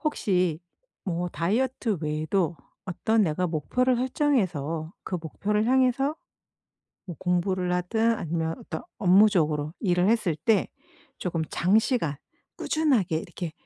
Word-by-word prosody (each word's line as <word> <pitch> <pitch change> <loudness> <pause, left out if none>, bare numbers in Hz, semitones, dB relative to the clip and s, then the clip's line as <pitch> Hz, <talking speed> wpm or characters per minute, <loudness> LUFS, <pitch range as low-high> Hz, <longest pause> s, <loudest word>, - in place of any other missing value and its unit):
혹시 180 - 0 0.4
뭐 180 -1 -2
다이어트 220 +4 -1
외에도 155 +3 -1 0.3
어떤 220 +4 +1
내가 180 0 0
목표를 250 - +1
설정해서 185 - 0
그 185 - -3
목표를 210 +7 -1
향해서 260 +3 +2 0.9
뭐 175 -4 -7
공부를 180 0 0
하든 220 +6 +1
아니면 165 -3 -2
어떤 160 - -6 0.2
업무적으로 175 -7 +3
일을 180 -2 +2
했을 215 -8 +1
때 200 +8 +2 0.5
조금 170 -3 -2
장시간 200 - +2 0.4
꾸준하게 260 - +1
이렇게 170 0 -6
180 Hz, 270 characters per minute, -26 LUFS, 165-225 Hz, 0.9 s, 업무적으로